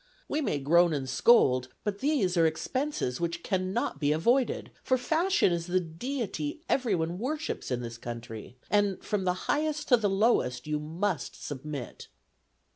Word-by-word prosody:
We 305 - -1
may 245 - 0
groan 170 +4 +4
and 135 -3 -2
scold, 130 - +4 0.2
but 205 -1 -2
these 265 -11 +1
are 165 -2 +5
expenses 170 - -2
which 170 0 -2
cannot 185 -1 -1
be 145 -1 +2
avoided; 235 - +1
for 260 - +2
fashion 325 - +2
is 170 0 -2
the 185 +1 +2
deity 180 - -4
everyone 180 -9 0
worships 300 +7 -3
in 125 -1 -1
this 115 -1 -7
country, 115 0 -7
and, 205 -2 +2
from 200 -3 -1
the 180 - +2
highest 300 0 0
to 245 - +7
the 210 -3 +1
lowest, 195 - +2
you 150 0 -1
must 165 +4 -3
submit." 145 -2 -6
180 Hz, 155 wpm, -29 LUFS, 150-245 Hz, 0.2 s, to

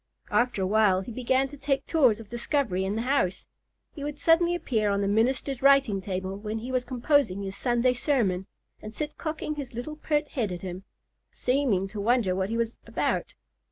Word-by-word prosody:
After 240 -5 +2
a - - +1
while 200 -2 +3
he 215 - -7
began 260 +3 +1
to 290 0 -11
make 275 0 +2
tours 255 -10 +3
of 225 - -10
discovery 235 -4 -1
in 195 +2 -1
the 225 - -1
house. 245 -9 0 0.5
He 285 - -7
would 295 0 -5
suddenly 340 +1 +4
appear 220 -11 0
on 200 0 +1
the 200 - 0
minister's 245 +5 +1
writing 275 -7 +4
table 190 0 -3
when 210 +2 -4
he 240 +4 -5
was 255 -1 +1
composing 250 -6 +1
his 195 -1 -5
Sunday 245 0 +2
sermon, 220 -9 0 0.3
and 215 +1 -8
sit 300 +4 -4
cocking 310 -1 -3
his 265 -5 -6
little 300 +6 -5
pert 300 -1 0
head 225 -8 -2
at 175 +1 -6
him, 185 +1 -6 0.5
seeming 250 -8 +1
to 210 0 -5
wonder 230 -3 +2
what 190 +1 -1
he 230 - -1
was 230 0 -2
about. - - -1
235 Hz, 195 wpm, -27 LUFS, 200-275 Hz, 0.5 s, suddenly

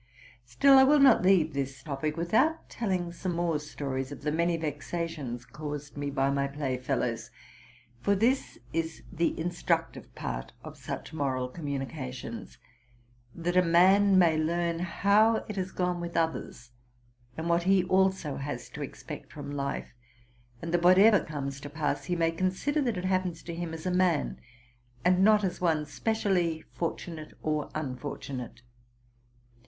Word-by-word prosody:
Still, 270 - +6
J 265 - +8
will 295 +2 +5
not 270 -4 +7
leave 180 -4 +4
this 135 -1 -4
topic 150 +1 -3
without 225 - +1
telling 185 -6 -1
some 175 +1 -3
more 170 -3 0
stories 135 -2 -4
of 145 - -9
the 150 - 0
many 170 +2 +1
vexations 150 -4 -4
caused 150 -1 -7
me 145 0 -3
by 135 0 +1
my 140 0 +1
playfellows; 130 -4 -2 0.7
for 200 +11 +2
this 240 +7 +1 0.2
is 165 0 -2
the 170 0 0
instructive 170 -1 -2
part - - -5
of - - -9
such - - -7
moral 130 -4 -1
communica 140 -2 -4
tions, 120 -2 -8 0.8
that 175 +1 -2
a 180 - +7
man 190 +3 +5
may 170 -3 +5
learn 170 +1 0
how 205 +5 +3
it 210 - -5
has 190 -1 -3
gone 180 -1 -1
with 170 0 -4
others, 160 -7 -2 0.7
and 160 +1 -3
what 170 0 +3
he 195 -2 +5
also 190 -5 +1
has 145 +1 -5
to - - -8
expect - - -8
from 145 -1 -7
life; 140 -3 -3 0.7
and 165 0 -4
that, 175 - +3
what 180 +1 +6
ever 205 +1 +6
comes 140 -2 -5
to 145 - -7
pass, 150 0 -2
he 180 - -1
may 165 -1 +2
consider 185 - 0
that 240 -7 0
it 180 - -3
happens 185 -3 -1
to 170 - -6
him 170 0 -4
as 160 +1 -7
aman, 180 - +1 0.7
and 180 +1 +4
not 210 0 +5
as 185 -2 -2
one 160 -4 +2
specially 175 -1 0
fortunate 165 -2 -4
or 155 -1 -1
unfortunate. 130 -3 -5
165 Hz, 155 wpm, -29 LUFS, 145-185 Hz, 0.8 s, J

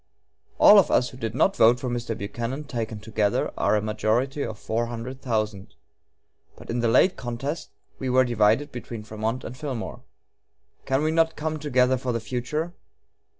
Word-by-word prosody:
All 210 - +9
of 190 - +3
us 125 - +3
who 125 - -12
did 115 -3 -4
not 195 +9 +3
vote 120 +2 +5
for 125 - -4
Mr. 120 -2 -3
Buchanan, 120 +7 -4
taken 115 -6 -4
together, 105 -1 0
are - - +2
a 105 - 0
majority 115 +6 0
of 110 -2 -5
four 115 +3 -2
hundred 120 +3 -6
thousand. 110 -5 -2 0.8
But - - -9
in 120 - -1
the 120 - +2
late 130 +11 +4
contest 130 +6 -4 0.3
we 130 - -2
were 130 +1 +4
divided 120 +4 +2
between 120 -2 -7
Frémont 110 +4 -3
and 120 - -7
Fillmore. 130 -4 -5 0.9
Can 135 +2 +1
we 155 - +1
not 165 0 +2
come 155 0 -3
together 130 -3 +2
for 125 -1 -2
the 115 - -1
future? 125 +9 -3
120 Hz, 175 wpm, -25 LUFS, 110-135 Hz, 0.9 s, All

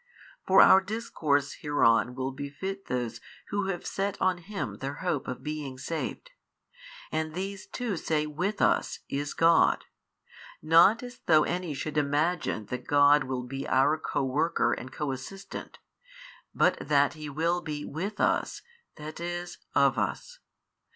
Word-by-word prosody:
For 190 - +7
our 190 - +7
discourse 165 -9 -1
hereon 125 -4 +3
will 130 +1 -2
befit 145 +9 -6
those 120 -2 -3 0.3
who 200 -1 -1
have 185 -3 -3
set 195 +1 -2
on 185 -1 +1
Him 165 - -5
their 135 +1 -4
hope 160 -6 -1
of 125 - -5
being 150 -4 -5
saved. 165 - -5 0.8
And 155 0 -2
these 195 +2 -5
too 235 -7 -3
say 155 -1 0
With 180 +8 -2
us - - +2
is 145 +1 -3
God, 165 0 +4 0.7
not 170 +9 +5
as 245 0 -9
though 155 -2 +6
any 175 -3 -2
should 150 +2 -2
imagine 145 -5 0
that 125 0 -5
God 145 0 +5
will 130 -1 -3
be 135 +2 -5
our 140 +4 +3
co 155 - -2
worker 135 -2 +1
and 130 - -6
co 150 -2 -3
assistant, 135 +10 -8 0.7
but - - +2
that 145 -1 +2
He 155 -2 -7
will 165 +4 0
be 150 -3 -5
with 195 +8 -5
us, - - 0 0.3
that 155 +1 -8
is, 175 +1 -5 0.2
of - - +4
us. - - -3
155 Hz, 150 wpm, -28 LUFS, 140-180 Hz, 0.8 s, For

